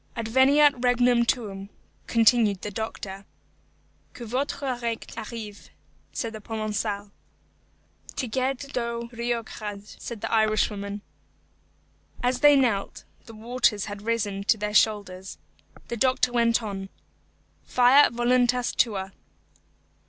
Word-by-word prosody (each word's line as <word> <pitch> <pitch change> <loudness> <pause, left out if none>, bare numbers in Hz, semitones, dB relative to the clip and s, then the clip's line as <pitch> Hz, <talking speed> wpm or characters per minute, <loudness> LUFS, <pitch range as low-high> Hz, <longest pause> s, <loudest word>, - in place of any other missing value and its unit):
"Adveniat 265 +4 +4
regnum 245 -1 +3
tuum," 200 -5 -2 0.4
continued 225 -4 +3
the 210 - -4
doctor. 200 -2 -6 0.9
"Que 240 - -8
votre 260 +2 -2
règne 230 -1 -3
arrive," 220 -2 -8 0.4
said 230 -2 -4
the 220 - -7
Provençal. 210 -1 -3 1.0
"Tigeadh 260 +2 -2
do 235 -1 -3
rioghachd," 220 -3 -5
said 230 -3 -7
the - - -3
Irishwoman. 210 -2 0 1.2
As 250 0 +1
they 290 0 +7
knelt, 235 -8 0 0.2
the 225 - -11
waters 230 -2 0
had 205 -1 -7
risen 205 -3 -1
to 220 - +3
their 210 0 -3
shoulders. 200 -3 +1 0.5
The 235 - -3
doctor 255 +1 +2
went 235 -1 +2
on, 195 -2 -5 0.7
"Fiat 255 +3 +5
voluntas 245 +1 +2
tua." 195 -5 0
230 Hz, 110 wpm, -26 LUFS, 210-245 Hz, 1.2 s, they